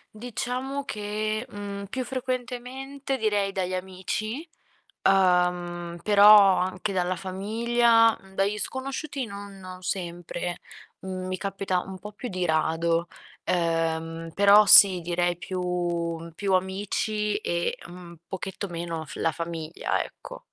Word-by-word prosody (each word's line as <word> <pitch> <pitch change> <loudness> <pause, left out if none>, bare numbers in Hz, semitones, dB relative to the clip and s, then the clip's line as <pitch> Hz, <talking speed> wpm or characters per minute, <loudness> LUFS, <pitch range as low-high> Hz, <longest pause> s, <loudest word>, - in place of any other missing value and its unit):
Diciamo 250 +4 -4
che, 215 +1 -2
mhmm, 200 -3 -6
più 255 +6 -3
frequentemente 255 +2 -4
direi 205 -3 +1
dagli 185 -1 -2
amici, 190 - -4 0.6
uhm, 180 -2 +2
però 205 -1 +8
anche 185 +2 -2
dalla 180 0 +1
famiglia, 230 +5 +3 0.2
dagli 200 +2 +1
sconosciuti 270 +2 -3
non 200 -1 -9
non 185 0 -10
sempre. 175 -1 -4 0.4
Mhmm, 185 -1 -5
mi 185 0 -2
capita 195 -1 -1
un 190 +1 -8
po' 210 +3 -9
più 235 +4 -7
di 185 -1 -1
rado, 165 +1 +1 0.4
uhm, 165 -1 -1
però 200 +3 +7
sì, 195 -3 +8
direi 175 +1 0
più 175 -2 -3
più 195 +1 0
amici 205 +3 -1
e 170 -4 -1
un 175 -1 -11
pochetto 190 +1 -5
meno 170 -2 -4
f 155 - -10
la 165 - +1
famiglia, 165 0 -3
ecco. - - -10
190 Hz, 120 wpm, -26 LUFS, 175-215 Hz, 0.6 s, però